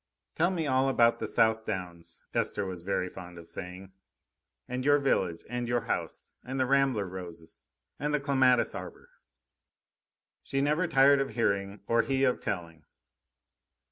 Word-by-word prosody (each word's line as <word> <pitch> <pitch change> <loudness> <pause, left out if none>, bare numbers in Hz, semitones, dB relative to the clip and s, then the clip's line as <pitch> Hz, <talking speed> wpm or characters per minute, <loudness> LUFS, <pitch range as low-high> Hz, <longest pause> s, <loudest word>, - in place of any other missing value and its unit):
"Tell 170 +2 +2
me 170 -4 -1
all 135 -1 +2
about 120 -3 +4
the - - -3
South 110 -1 +2
Downs," 85 -4 -6
Esther - - 0
was 90 -2 -5
very 90 0 -1
fond 90 -1 -10
of 85 -1 -11
saying; 95 +2 -8 0.8
"and 125 +1 -3
your 145 +1 +5
village, 95 - 0
and 120 +1 -3
your 120 0 +1
house, - - -4
and 130 +1 -4
the 130 - +3
rambler 135 -5 +2
roses 85 -3 -9 0.3
and 150 +1 -1
the 150 - +2
clematis 130 -3 +3
arbour." - - -9 1.3
She 135 - -2
never 150 +6 +1
tired 140 -2 +5
of 135 - -2
hearing, 100 -3 0
or 115 +2 +3
he 135 +2 0
of 130 -2 +2
telling. 80 -4 -5
120 Hz, 155 wpm, -29 LUFS, 95-135 Hz, 1.3 s, your